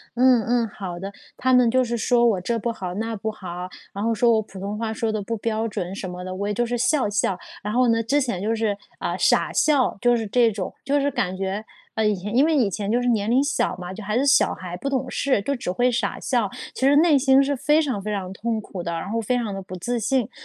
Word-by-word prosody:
“嗯 250 -1 +5
嗯， 240 -1 +2
好 185 -4 -6
的。” 195 +3 -6 0.2
他 260 0 0
们 250 -2 +5
就 255 +2 +3
是 240 -1 -2
说 240 +1 +3
我： 215 -5 +3
“这 230 +6 -1
不 235 +1 -2
好、 185 -5 -5
那 225 +4 -3
不 220 +2 -3
好，” 180 -4 -6 0.3
然 200 - -5
后 230 0 +1
说 235 +1 +4
我： 220 - +3
“普 195 -2 -11
通 200 +2 -4
话 220 0 -2
说 220 0 -1
得 215 -1 -2
不 230 +3 -3
标 225 +1 -1
准 185 -4 -4
什 195 -1 -5
么 180 0 -7
的，” 185 0 -5
我 200 +2 -3
也 210 - -1
就 240 +4 0
是 240 +1 -2
笑 255 -1 +2
笑。 200 -2 0 0.2
然 210 +1 -4
后 250 0 +3
呢， 230 0 +3
之 275 +6 +1
前 235 -9 -2
就 220 +3 0
是 220 -2 0 0.2
呃， - - -2
傻 - - +3
笑 285 -7 +2
就 245 +2 +3
是 225 -1 -2
这 235 +3 +3
种， 200 -3 -4
就 285 +1 +2
是 285 - +1
感 185 -6 -1
觉， 195 +2 -3 0.3
呃， 220 - +1
以 210 - +2
前 200 +3 -6
因 270 +4 +5
为 320 0 +2
以 245 -8 +3
前 200 +1 -3
就 240 +2 +2
是 245 - -1
年 215 -3 +1
龄 255 +4 +4
小 285 - 0
嘛， 180 0 -6
就 210 - -8
还 210 +3 -1
是 270 - +2
小 275 -1 +4
孩 180 -1 -7
不 275 - -3
懂 265 -1 -1
事， 265 -7 +1
就 280 +8 -1
只 240 - -5
会 245 +7 +2
傻 230 -4 -1
笑， 235 -6 0 0.2
其 265 - +1
实 285 - +5
内 310 -1 +5
心 265 0 +5
是 280 +1 0
非 300 +4 +3
常 260 -9 -2
非 210 - -5
常 190 -2 -4
痛 220 +3 -2
苦 190 -3 -7
的， 170 - -3
然 165 +3 -4
后 230 +2 -1
非 230 +3 0
常 225 -4 -2
得 195 - -5
不 185 -1 -8
自 240 +7 -2
信。 240 +1 0
225 Hz, 295 characters per minute, -23 LUFS, 200-250 Hz, 0.3 s, 嗯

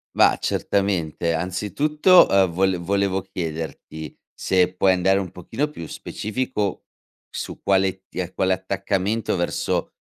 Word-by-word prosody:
Ma - - +5
certamente, 85 -4 0
anzitutto, 145 - +3
ehm, 95 -1 +4
vole 95 +1 +1
volevo 95 +2 0
chiederti, 80 -3 -6 0.2
se 90 -1 +1
puoi 95 +1 +4
andare 95 +2 +2
un 95 -3 -4
pochino 115 - -3
più 85 - -8
specifico, 105 +3 -3 0.4
su - - -6
quale 95 -1 +1
t 90 0 -5
quale 95 0 +2
attaccamento 100 +3 -1
verso 85 -1 -1
95 Hz, 120 wpm, -23 LUFS, 90-100 Hz, 0.4 s, Ma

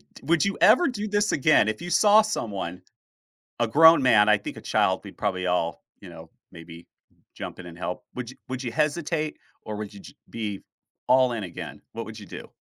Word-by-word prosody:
D - - -15
would 165 +6 +2
you 200 - -1
ever 255 +11 +6
do 215 -5 -3
this 205 0 +1
again? 145 -5 +3
If 110 0 -3
you 175 - -6
saw 210 +4 +6
someone, 100 - -4 0.8
a 120 - +3
grown 160 +3 +7
man- 110 -4 +5
I 105 - +5
think 100 - -8
a - - -8
child - - +1
we'd - - -12
probably 95 0 -2
all, 85 -3 -1 0.2
you - - -12
know, - - -12 0.2
maybe 85 +1 -12 0.5
jump - - -8
in 90 - -10
and 85 -1 -11
help- 90 0 -5
would 125 -1 -6
you 130 - -15
would 130 0 -4
you 120 - -4
hesitate 155 +2 -1 0.2
or 105 - -6
would 105 0 -6
y 100 - -11 0.3
be 105 -4 -5 0.5
all 130 -1 +4
in 110 -3 -4
again? 85 -2 -8
What 115 - -5
would 110 0 -9
you 105 - -11
do? - - -10
120 Hz, 210 wpm, -25 LUFS, 100-160 Hz, 0.8 s, grown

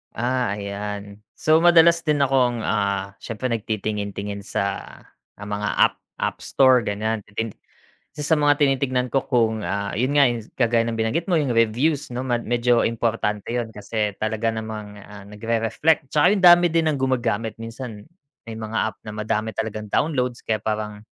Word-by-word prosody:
Ah, 125 -3 0
ayan. 100 0 -6 0.2
So, 155 +1 +3
madalas 170 0 +6
din 150 -2 +2
akong, 125 -4 +1
ah, 100 -2 -1
siyempre 120 +2 -4
nagtitingin 105 -2 -3
tingin 100 0 -4
sa, - - -1 0.7
ah, 105 - -9
mga 105 0 -2
app - - +4 0.2
App - - -3
Store 130 -2 +4
ganyan 110 +1 -2
titing 110 +1 -4 0.7
isa 150 +2 +2
mga 145 -1 +3
tinitingnan 130 -2 +1
ko 135 - +3
kung, 110 -4 +1
ah, 100 0 -2
yun 125 +5 +1
nga 140 - +7 0.3
kagaya 115 -1 +3
ng 115 -1 -3
binanggit 140 +12 -1
mo 170 - +4
yung 140 -6 0
reviews 125 +7 +1
'no, 125 0 -4
mad 120 -2 0
medyo 120 0 +2
importante 110 -3 -1
yun 120 -1 -2
kasi 105 0 -2
talaga 110 +1 -1
namang, 110 -2 -6
ah, 100 0 -12
nag-re-reflect. 115 +8 0
'Tsaka 165 +7 +4
yung 195 - -2
dami 175 0 +8
din 165 -1 +2
ng 145 - -2
gumagamit 120 -4 0
minsan 115 -2 -7 0.4
may 115 -1 -8
mga 110 0 -5
app 100 - -21
na 105 - -6
madami 110 0 -2
talagang 110 -1 -3
downloads 125 -1 0
kaya 110 -1 -1
parang 105 0 -3
115 Hz, 165 wpm, -23 LUFS, 105-130 Hz, 0.7 s, dami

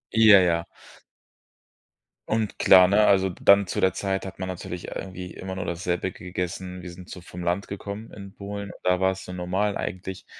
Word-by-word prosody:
Ja, 110 -3 +8
ja. 85 -2 +1 1.6
Und 110 -1 -1
klar, 95 -1 +7
ne, 105 +3 +4
also 95 -1 +4
dann 100 +2 +4
zu - - -2
der 95 - +4
Zeit 95 -1 -2
hat 95 0 -9
man 95 - -3
natürlich 90 -1 -6
irgendwie 90 -1 -7
immer 95 0 -6
nur 95 -1 -4
dasselbe 90 +1 -2
gegessen. 90 0 -5
Wir 90 - -8
sind 90 +1 -12
so - - -8
vom 90 0 -9
Land 90 +3 -1
gekommen 100 +2 -7
in 100 -1 -10
Polen. 100 0 -6
Da 90 0 +2
war 95 - +4
es 95 - -8
so 90 - -8
normal 95 +3 -1
eigentlich, 95 0 -5
95 Hz, 185 wpm, -25 LUFS, 90-100 Hz, 1.6 s, Ja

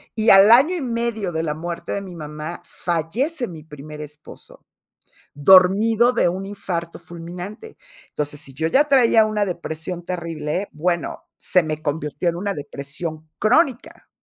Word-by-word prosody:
Y 220 0 +4
al 195 +2 +8
año 275 +10 +6
y 345 - -3
medio 230 -6 -2
de 160 -1 -2
la 150 -2 -1
muerte 170 +2 -6
de 200 - -2
mi 185 -3 -9
mamá, 150 +1 -7
fallece 235 - -2
mi 160 -4 -10
primer 150 0 -10
esposo, 150 0 -13 0.7
dormido 195 - +5
de - - +2
un 190 +2 -4
infarto 180 -4 -4
fulminante. 180 - -9 0.3
Entonces, 145 0 -4
si 135 - -8
yo 160 +4 -1
ya 285 - +3
traía 235 -5 +5
una 215 -1 0
depresión 175 -1 -5
terrible, 170 +1 -3
bueno, 170 +2 -2
se 180 - +2
me 155 -1 -4
convirtió 150 +2 -2
en 170 - -3
una 200 +3 -2
depresión 155 +2 -7
crónica. 255 +2 +1
175 Hz, 150 wpm, -21 LUFS, 155-215 Hz, 0.7 s, al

